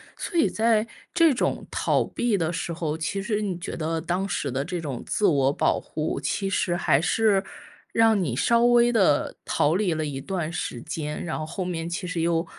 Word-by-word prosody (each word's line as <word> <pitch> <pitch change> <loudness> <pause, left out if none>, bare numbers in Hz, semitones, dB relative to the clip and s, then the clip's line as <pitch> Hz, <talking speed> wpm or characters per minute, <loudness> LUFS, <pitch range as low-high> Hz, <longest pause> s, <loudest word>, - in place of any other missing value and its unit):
所 345 - -4
以 315 - +5
在 225 0 +2 0.2
这 330 -4 +4
种 245 - -1
逃 - - +1
避 235 -4 0
的 165 -1 -1
时 170 - -3
候， 160 -2 -2
其 160 +5 -3
实 210 0 -1
你 195 -4 -2
觉 175 - -6
得 160 0 -2
当 180 +4 -2
时 175 - -2
的 135 +2 -1
这 175 +3 -4
种 140 -7 -5
自 210 - 0
我 140 -7 +4
保 - - +1
护， 155 -2 -3
其 195 +8 -1
实 185 -2 0
还 145 -5 +2
是 200 +1 +2 0.5
让 225 -3 +4
你 130 -8 -2
稍 235 - +3
微 240 0 +5
地 195 -11 +2
逃 145 - +1
离 185 -3 +1
了 155 0 -1
一 140 -2 -4
段 170 -1 -3
时 120 - -4
间， 155 -1 -4
然 170 - -3
后 - - -3
后 180 +3 -4
面 170 -2 -3
其 175 +2 -4
实 175 -2 -2
又 165 0 +1
175 Hz, 225 characters per minute, -25 LUFS, 155-205 Hz, 0.5 s, 以